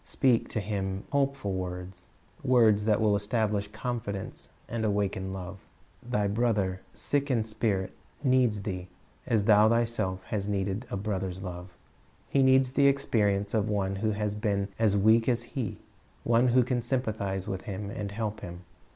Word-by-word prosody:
Speak 125 -4 +2
to - - -2
him 100 -2 -3
hopeful 140 -8 0
words, 90 0 -5 0.4
words 110 -5 +4
that 105 -2 +3
will 105 -2 +3
establish 105 -1 0
confidence 105 -2 -5 0.2
and 115 -1 -3
awaken 100 -2 -1
love. 95 0 -6
^i - - -23 0.5
^ir - - -8
Thy 105 -4 +2
brother, 100 -4 0
sick 145 0 -1
in 120 -4 +2
spirit, 110 -3 -1 0.3
needs 125 -6 +3
thee, 90 -3 -4 0.4
as 110 -3 +2
thou 105 0 +6
thyself 115 -5 0
hast 100 +1 -3
needed 100 +4 -2
a - - -3
brother's 95 -2 -3
love. 90 -1 -6 0.6
He 140 - +3
needs 130 -1 +5
the 140 +1 +4
expenence 105 -7 +1
of 110 -1 +1
one 100 -2 0
who 110 +2 0
has 105 0 -1
been 100 -2 -1
as 105 -3 +3
weak 110 +4 +4
as 120 -1 +1
he, 120 -3 -4 0.5
one 120 +2 +3
who 125 0 +4
ean 125 -1 0
sympathize 110 -6 -2
with 95 -2 -4
him 100 +1 -4
and 105 -1 -4
help 105 0 -3
him. 85 -2 -8
105 Hz, 165 wpm, -28 LUFS, 100-115 Hz, 0.6 s, thou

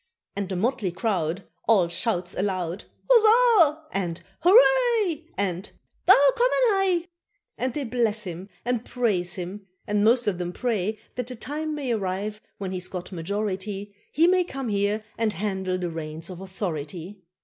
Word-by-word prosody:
And 200 -2 -3
the 190 - -2
motley 215 -1 0
crowd 185 -2 -1 0.2
All 200 -6 +5
shouts 175 +1 -1
aloud, 185 -2 -2 0.2
"Huzzah" 440 -9 +5
and 175 -4 -2 0.2
"hooray," 430 -3 +4
And 190 -1 -2 0.4
"Daar 285 -7 +8
komaan - - +3 0.3
hy." - - -27 0.5
And 255 0 -2
they 295 - -1
bless 225 -3 0
him, 180 +1 -7 0.2
and 245 -1 0
praise 205 -10 0
him, 190 +2 -6 0.2
and 205 0 +1
most 235 +2 +4
of 195 -4 0
them 175 0 -3
pray 215 -3 -1 0.2
That 250 -2 -2
the 250 - -5
time 300 +6 -4
may 275 -4 -2
arrive, 205 0 -2 0.2
when 190 -2 -4
he's 180 -1 -2
got 180 -1 -5
to - - -12
majority, 200 +2 -3 0.2
He 320 - +4
may 365 +1 +4
come 270 -7 -5
here 205 +1 0 0.2
and 220 -2 +1
handle 190 -1 -2
the 175 -2 -3
reins 160 +2 -6
of 180 0 -8
authority. 185 0 -5
205 Hz, 160 wpm, -25 LUFS, 185-255 Hz, 0.5 s, Daar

